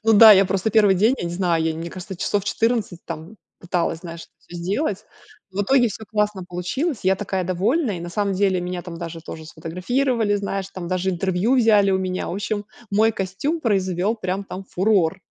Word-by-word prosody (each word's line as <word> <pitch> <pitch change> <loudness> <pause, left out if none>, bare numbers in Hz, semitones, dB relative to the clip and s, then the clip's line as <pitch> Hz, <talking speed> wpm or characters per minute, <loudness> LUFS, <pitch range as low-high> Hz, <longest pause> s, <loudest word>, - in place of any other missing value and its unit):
Ну 225 - +5
да, 220 0 +10
я 195 -1 +6
просто 195 +3 0
1 205 -2 +5
день, 220 +8 +3
я - - -3
не 170 - -3
знаю, 175 -2 +1
я, 160 0 0
мне 165 +1 -6
кажется, 185 +1 -8
часов 195 +2 -1
14 220 -5 -1
там 165 +5 -7 0.2
пыталась, 170 -2 -1
знаешь, 170 -1 -8
это - - -16
всё 175 - -11
сделать. 195 - -2 0.5
В 200 +2 0
итоге 245 +3 +4
всё 220 +1 -8
классно 210 -3 0
получилось. 220 - -2
Я 190 +1 +4
такая 190 -2 -2
довольная 205 - 0
и, - - -8
на 175 - -6
самом 200 +2 -1
деле, 190 -1 +2
меня 180 0 -4
там 175 -2 -8
даже 165 -1 -6
тоже 160 0 -9
сфотографировали, 205 - -1
знаешь, 200 -1 -2
там 175 -2 -5
даже 185 +1 0
интервью 190 +7 +1
взяли 210 -4 +5
у 190 - +2
меня. 185 -1 -2
В - - -3
общем 205 +1 -3 0.3
мой 220 +3 +3
костюм 205 - -2
произвел 195 - 0
прям 190 -1 -3
там 195 0 -7
фурор. 190 -3 +1
190 Hz, 205 wpm, -22 LUFS, 175-215 Hz, 0.5 s, да